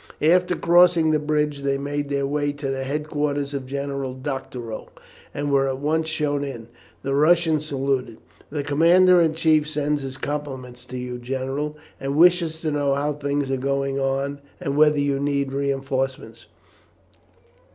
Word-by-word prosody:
After 180 +3 +4
crossing 170 -1 +5
the 155 - +2
bridge 150 -1 0
they 140 0 0
made 145 +1 -3
their 140 -1 0
way 145 +1 -1
to 145 -1 -4
the 135 0 -2
headquarters 145 0 -2
of 135 -2 -4
General 140 -1 -3
Doctorow, 130 -4 -6 0.4
and 145 0 -3
were 135 -1 +3
at 135 -1 -2
once 155 +3 0
shown 150 -2 -1
in. 120 -5 -7 0.3
The 135 - -1
Russian 160 +2 +4
saluted: 135 -5 -2 0.3
"The 145 -1 -3
commander 170 +5 +5
in 160 -1 +2
chief 155 -2 +3
sends 150 -1 -1
his 135 -1 -6
compliments 130 -4 -5
to 125 0 -7
you, 125 0 -5
general, 135 +4 -3 0.2
and 135 +1 -3
wishes 170 -1 +4
to 155 - -1
know 145 -2 +1
how 145 +1 0
things 140 -1 -2
are 135 - +1
going 140 +1 -1
on, 135 +1 -1 0.2
and 140 - -2
whether 150 0 +4
you 140 -1 +1
need 140 -1 -1
reinforcements. 135 -4 -2
140 Hz, 160 wpm, -23 LUFS, 135-150 Hz, 0.4 s, crossing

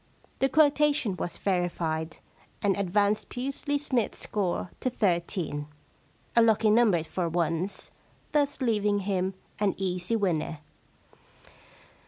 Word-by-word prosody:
The 270 - +3
quotation 295 -7 +3
was 175 -1 -4
verified, 170 -4 -1 0.5
and 200 -2 +3
advanced 205 +2 +1
Pusely 275 +3 -2
Smythe's 260 -5 -1
score 185 -4 -2
to 255 - 0
thirteen 170 -8 -1 0.3
— - - -35
a 235 - +7
lucky 220 -1 +4
number 210 -7 +4
for 170 +1 -2
once 170 +3 -1 0.2
— - - -34
thus 285 -2 +1
leaving 210 -4 +1
him 190 -1 -1 0.2
an 205 -2 +1
easy 185 +2 -1
winner. 170 -7 0
200 Hz, 120 wpm, -28 LUFS, 175-235 Hz, 0.5 s, a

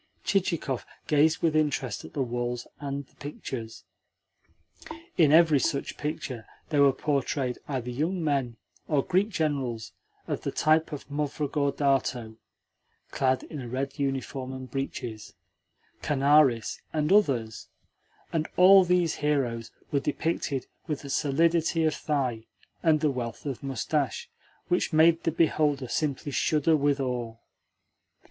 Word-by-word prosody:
Chichikov 170 - 0 0.2
gazed 155 +1 +3
with 160 -2 +2
interest 155 -2 0
at - - -11
the 140 - 0
walls 120 0 -3
and 140 -1 -4
the - - -30
pictures. 130 -5 -7 1.3
In 155 -5 +5
every 160 -2 +6
such 140 0 -1
picture 130 -6 -5 0.2
there 145 -3 +3
were 140 -1 +7
portrayed 135 -2 -1
either 125 -4 -3
young 165 +8 -1
men 135 -6 0 0.3
or 145 -3 +2
Greek 190 +3 +2
generals 140 - -2 0.4
of - - -2
the - - -2
type 155 +1 +2
of 145 - -7
Movrogordato 140 -5 0 0.7
(clad 130 -1 +1
in 150 - -7
a 120 - -7
red 135 +3 -3
uniform 135 -1 -2
and 130 -1 -8
breaches), 120 -5 -5 0.7
Kanaris, 140 -4 +3
and 155 +3 +1
others; 125 - +1 0.7
and 160 -1 0
all 190 +1 +8
these 180 -2 +1
heroes 125 -6 0 0.2
were 140 - +2
depicted 145 -2 -2 0.2
with 150 -3 -3
a 140 - -5
solidity 165 +4 +2
of 155 -1 +2
thigh 130 -7 -2 0.3
and 160 -2 +3
a 150 - +3
wealth 120 -1 -5
of 135 -4 -4
moustache 135 +1 -2 0.4
which 180 -1 0
made 165 +1 +5
the 165 - +2
beholder 150 -4 +1
simply 145 +2 -2
shudder 155 +3 +2
with 145 -1 +1
awe. 120 -4 -3
140 Hz, 130 wpm, -27 LUFS, 130-155 Hz, 1.3 s, all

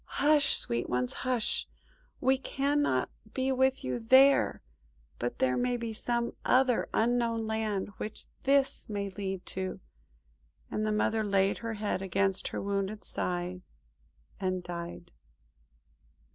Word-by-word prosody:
"Hush, 290 -1 +4
sweet 120 0 -1
ones, 125 0 0
hush! 250 -4 -1 0.5
We 265 0 +3
cannot 275 - 0 0.2
be 265 0 +1
with 265 0 +2
you 130 -1 -2
there. 265 +4 +5 0.6
But 120 0 -2
there 125 -1 +2
may 245 0 +1
be 230 -1 -4
some 235 +2 -1
other 255 -1 +3
Unknown 230 -1 +1
Land 220 -3 -1
which 215 - -5 0.2
this 275 -2 +2
may 200 -1 -3
lead 190 -1 -4
to;" 185 0 -4 0.9
and 215 0 -1
the - - +1
Mother 215 +1 +1
laid 195 -1 +2
her 230 -1 -4
head 205 -3 -2
against 195 0 +1
her - - -4
wounded 200 +1 -2
side 180 0 -3 0.8
and 185 -2 -1
died. 175 0 -7
215 Hz, 130 wpm, -30 LUFS, 190-250 Hz, 0.9 s, there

